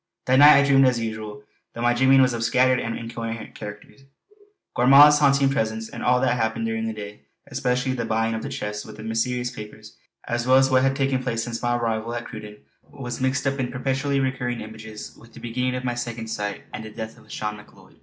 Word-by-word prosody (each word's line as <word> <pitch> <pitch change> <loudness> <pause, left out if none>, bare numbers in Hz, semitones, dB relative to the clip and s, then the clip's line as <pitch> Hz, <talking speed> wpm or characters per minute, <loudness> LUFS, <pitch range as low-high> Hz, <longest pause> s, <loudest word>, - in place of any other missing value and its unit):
That 130 +1 +3
night 145 +1 +9
I 140 - +3
dreamed 135 -1 +5
as 125 -2 +1
usual, 110 -2 -6 0.3
though 115 - -4
my 120 0 +3
dreaming 130 +2 +5
was 130 -1 +2
of 115 - -3
a - - -2
scattered 125 +2 +3
and 115 - -3
incoherent 115 0 -6
character. 105 -1 -9 0.9
Gormala's 140 +4 +7
haunting 140 -1 +3
presence 110 -4 -2
and - - -8
all 125 0 +3
that 130 - +2
had 125 - 0
happened 110 0 -1
during 110 0 -2
the - - -2
day, 105 -3 -9 0.2
especially 125 +1 -1
the 120 -2 -3
buying 115 0 0
of 110 - -3
the - - -5
chest 105 0 -5
with 110 -1 -12
the 110 - -9
mysterious 120 +2 -1
papers, 110 -1 -11 0.3
as 120 0 -2
well 130 +1 +6
as 135 0 +3
what 130 0 +4
had 135 +1 +2
taken 135 -1 0
place 115 -3 -2
since 115 0 -5
my 120 0 +1
arrival 115 0 -2
at 120 - -5
Cruden 105 -2 -9 0.3
was 125 -3 -7
mixed 130 +1 0
up 135 0 -1
in 125 -2 -2
perpetually 135 +2 -1
recurring 125 -3 -2
images 110 0 -9
with 115 0 -18
the - - -10
beginning 125 +2 -2
of 125 - -4
my 125 -1 -1
Second 120 -2 -5
Sight 105 -2 -4
and - - -6
the 110 - -8
death 110 +1 -8
of - - -20
Lauchlane 105 0 -5
Macleod. 105 - -18
120 Hz, 230 wpm, -23 LUFS, 110-130 Hz, 0.9 s, night